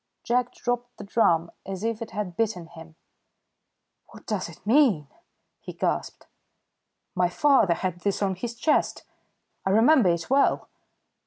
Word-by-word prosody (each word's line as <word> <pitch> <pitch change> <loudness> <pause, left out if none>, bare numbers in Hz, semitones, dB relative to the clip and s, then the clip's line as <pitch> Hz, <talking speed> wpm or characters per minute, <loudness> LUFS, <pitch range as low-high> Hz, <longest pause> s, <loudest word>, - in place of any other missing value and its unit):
Jack 245 +1 0
dropped 245 0 -3
the - - -8
drum 170 -5 +2
as 195 +1 -6
if 230 0 -2
it 225 - -5
had 205 -5 -5
bitten 215 -5 -1
him. 165 -1 -14 1.1
"What - - -15
does 205 -6 -3
it 170 +3 -15
mean?" 220 - +3 0.5
he - - -9
gasped. - - -3 0.9
"My 180 -1 +1
father 225 -5 +3
had 180 -1 -3
this 200 +2 -1
on 195 -1 +1
his 230 +6 -5
chest. 300 +6 +1 0.6
I - - -1
remember 225 - +5
it 170 -1 -1
well!" 275 +2 +2
205 Hz, 145 wpm, -25 LUFS, 175-240 Hz, 1.1 s, remember